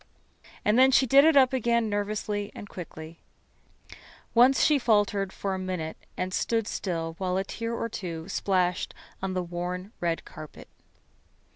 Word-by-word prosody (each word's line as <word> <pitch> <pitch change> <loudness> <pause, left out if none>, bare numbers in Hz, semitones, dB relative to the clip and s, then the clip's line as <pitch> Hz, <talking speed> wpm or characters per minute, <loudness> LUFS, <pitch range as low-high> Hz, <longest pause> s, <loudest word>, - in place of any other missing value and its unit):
And 215 +4 +4
then 260 +1 +7
she 265 0 +5
did 275 +3 +6
it 320 -2 +5
up 265 -1 +5
again 235 -2 +1
nervously 205 0 -2
and 205 - -8
quickly. 165 -3 -9 1.1
Once 250 +3 +5
she 300 -2 +4
faltered 205 -4 +2
for 195 0 -3
a 190 - -3
minute 180 -4 -4 0.2
and 185 0 -2
stood 225 +1 0
still 165 -3 -3
where 185 -1 -1
a 190 - +1
tear 230 +3 -4
or 230 - -2
two 170 -6 -6
splashed 185 -3 0 0.3
on 190 -1 -2
the 185 - 0
worn 180 +3 -5
red 170 -1 -1
carpet. 155 -3 -11
195 Hz, 155 wpm, -27 LUFS, 180-230 Hz, 1.1 s, then